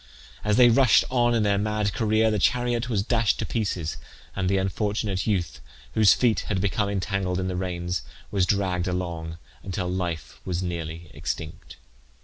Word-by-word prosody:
As 105 0 +2
they 125 -1 +8
rushed 125 +1 +5
on 120 -2 +3
in 110 - +2
their 100 -1 +2
mad 105 -1 0
career 110 0 +2
the 105 - 0
chariot 120 +4 +1
was 105 -5 +1
dashed 115 0 +2
to - - -2
pieces, 95 -8 -2 0.4
and 95 -2 0
the 100 - +2
unfortunate 100 +1 -1
youth, 90 - -1 0.3
whose 110 -2 +6
feet 120 -3 +2
had 100 -3 0
become 100 +1 0
entangled 95 -1 -1
in 95 - -1
the 90 - -2
reins, 90 -3 -2 0.3
was 95 -3 +2
dragged 95 -3 0
along 85 -3 -3 0.2
until 95 -1 -3
life 90 -3 -3
was 90 -1 -2
nearly 85 -2 -5
extinct. 80 -1 -6
95 Hz, 165 wpm, -25 LUFS, 90-110 Hz, 0.4 s, they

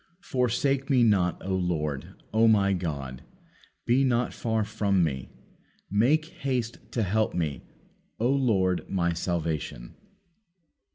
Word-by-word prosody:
Forsake 130 +2 0
Me 130 -4 +4
not, 95 -6 +3
O 95 0 0
Lord; 75 -6 -2 0.2
O 115 +1 +5
My 100 -3 +4
God, 70 -8 -4 0.6
be 125 +3 +3
not 125 -2 +1
far 110 -2 -1
from 100 -3 +1
Me. 65 -5 -2 0.6
Make 130 +10 +3
haste 125 -4 -2
to 115 - +1
help 110 +3 0
Me, 80 -5 -2 0.6
O 115 - +2
Lord 100 -10 +1
My 85 -3 +1
salvation." 80 -8 -3
100 Hz, 120 wpm, -27 LUFS, 85-120 Hz, 0.6 s, O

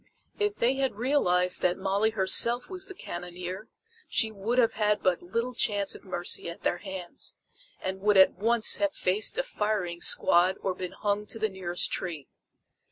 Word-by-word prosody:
If 415 0 0
they 255 +3 +1
had 270 -5 0
realized 180 -8 +2
that 180 0 +1
Molly 195 +3 +1
herself 220 - +2
was 370 0 -1
the 385 - -9
cannoneer, 180 - -7 0.4
she 220 -2 +2
would 215 +4 -3
have 235 -3 +4
had 210 -1 +1
but 185 -2 +2
little 230 +8 -3
chance 205 -4 0
of - - -11
mercy 175 -2 -2
at 170 - -10
their 175 - 0
hands, 190 -3 -6 0.4
and 190 0 -4
would 205 0 +3
at 190 - +7
once 230 +1 +2
have 300 0 0
faced 205 - +1
a - - +1
firing 210 - -2
squad 180 +2 +4
or 190 - -1
been 180 -1 -6
hung 210 0 -2
to - - -5
the 220 0 0
nearest 180 -2 -2
tree. 160 -7 -4
200 Hz, 175 wpm, -28 LUFS, 180-230 Hz, 0.4 s, at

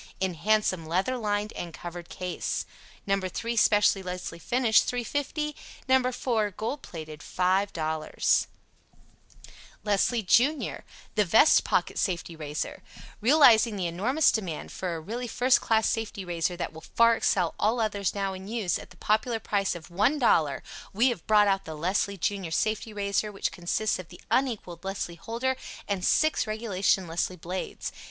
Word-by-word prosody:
In 190 -1 0
handsome 185 -2 +1
leather 190 +10 0
lined 210 -2 -2
and 170 -2 -6
covered 175 0 -8
case. 180 -1 -3 0.4
No.3. 195 +4 -1
Special 205 -2 +4
Leslie 180 -2 -6
Finish 235 +3 +3
$3.50 290 +5 -2 0.3
No.4. 250 -5 +1
Gold 260 +6 -3
Plated. 155 -2 -8
5.00 180 -4 0 1.4
LESLIE 215 +3 +1
JUNIOR 270 - +2 0.3
The 210 - +3
Vest 220 - +5
Pocket - - 0
Safety 170 -3 -2
Razor 150 -1 -5 0.4
Realizing 235 -4 +6
the 190 -3 -2
enormous 225 - +2
demand 185 -8 -4
for 180 -3 -3
a - - -4
really 235 +9 -5
first 250 +2 +3
class 220 -1 +2
Safety 220 -4 -2
Razor 175 0 -1
that 175 - -4
will 160 - -10
far 230 +5 +4
excel 180 -6 +1
all 225 +4 +2
others 205 -4 -1
now 195 -1 -1
in 190 +1 -8
use, 210 -6 -1
at - - -11
the - - -17
popular 220 +2 0
price 200 -4 0
of 170 -1 -10
$1.00, 210 - +2 0.3
we 235 +6 +4
have 230 -9 -5
brought 210 -1 +5
out 195 -1 +1
the 160 - -6
Leslie 195 +4 0
Junior 195 0 -2
Safety 215 +6 -1
Razor 205 0 -1
which 195 - -2
consists 185 +4 -1
of 185 - -8
the 175 - -13
unequaled 215 -10 -1
Leslie 195 -2 -4
Holder 235 +9 -2 0.3
and 200 -3 -2
six 310 +4 +2
regulation 200 -3 0
Leslie 170 +2 -2
blades. 180 +3 -5
200 Hz, 150 wpm, -27 LUFS, 180-230 Hz, 1.4 s, Realizing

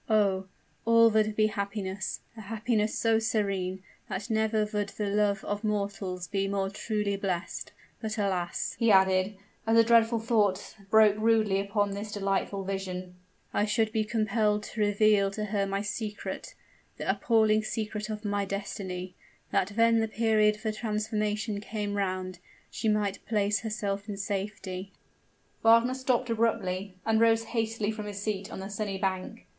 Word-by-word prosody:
Oh! 195 -3 +2 0.4
all 230 0 +6
would 215 0 +2
be 215 - +4
happiness 200 -2 -3
a 220 - -8
happiness 215 +1 -1
so 225 -1 +3
serene, 195 -4 -1 0.3
that 200 +3 -4
never 220 -1 +2
would 205 -1 0
the 210 +1 -4
love 200 -1 +1
of 205 +1 -3
mortals 200 -4 -2
he 195 -1 0
more 195 -1 -1
truly 210 -1 -1
blessed! 190 -3 -3 0.3
But, 220 0 -3
alas!" 185 -4 -1
he 230 -2 +3
added, 190 +1 +4 0.3
as 225 +1 +4
a 230 - +8
dreadful 230 0 +4
thought 215 -4 +1 0.2
broke 215 -1 +6
rudely 215 -3 +3
upon 200 0 0
this 205 +2 -5
delightful 195 -1 -1
vision, 185 -2 -4 0.4
"I 205 - +2
should 220 0 +1
be 220 0 +1
compelled 215 -1 +1
to 215 - -5
reveal 205 -1 +4
to 210 +2 -4
her 200 -1 0
my 195 +1 -1
secret 210 0 -5 0.4
the - - -5
appalling 220 -2 +3
secret 215 -1 -3
of 215 0 -5
my 205 0 0
destiny: 195 -2 -4 0.4
that 185 - +2
when 230 +1 +4
the 225 - +1
period 215 -1 +3
for 220 0 -1
transformation 215 -1 -2
came 210 -1 -3
round, 185 -2 -2 0.3
she 225 - -1
might 210 -2 0
place 205 -2 +1
herself 205 -2 -3
in 200 - -4
safety 195 -2 -4 0.3
" - - -39
Wagner 230 +2 +5
stopped 255 -2 0
abruptly, 200 -4 0
and 225 0 +3
rose 225 0 +4
hastily 225 -2 -1
from 215 -1 -6
his 200 -1 -5
seat 200 -2 -3
on - - -6
the 190 - -5
sunny 200 -1 -3
bank. 190 -1 -3
210 Hz, 160 wpm, -29 LUFS, 195-220 Hz, 0.4 s, a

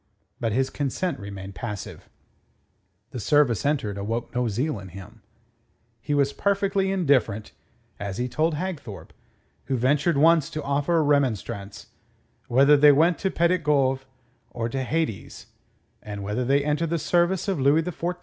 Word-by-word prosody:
But 115 -2 -1
his 130 +4 0
consent 145 +3 -2
remained 100 -1 -8
passive. 105 -2 -7 1.0
The 125 - -5
service 135 -4 +2
entered 110 -9 -1
awoke 115 +4 -4
no 125 0 0
zeal 120 +4 -2
in 95 - -10
him. 95 +5 -12 0.8
He 145 - -1
was 140 -1 +2
perfectly 195 -1 0
indifferent 135 - +1 0.5
as 100 -2 -5
he 125 - -1
told 155 +5 0
Hagthorpe, 150 - -6 0.5
who 130 - -1
ventured 140 +5 +2
once 160 0 +4
to 155 - -5
offer 145 +4 0
a 160 - +3
remonstrance 115 -8 -1 0.6
whether 140 +4 +5
they 145 +1 +7
went 160 +4 +3
to 190 - 0
Petit 170 +1 +2
Goave 135 -3 +1 0.4
or 115 -1 -3
to 135 +3 -3
Hades, 130 - -3 0.6
and 105 -1 -7
whether 105 +5 -2
they 140 +2 +2
entered 150 +2 0
the 170 - 0
service 175 +4 +1
of 190 -6 -1
Louis 145 +4 +3
XIV 180 0 -7
or 175 - +2
of 180 - -3
Satan. - - -27
140 Hz, 160 wpm, -25 LUFS, 115-160 Hz, 1.0 s, they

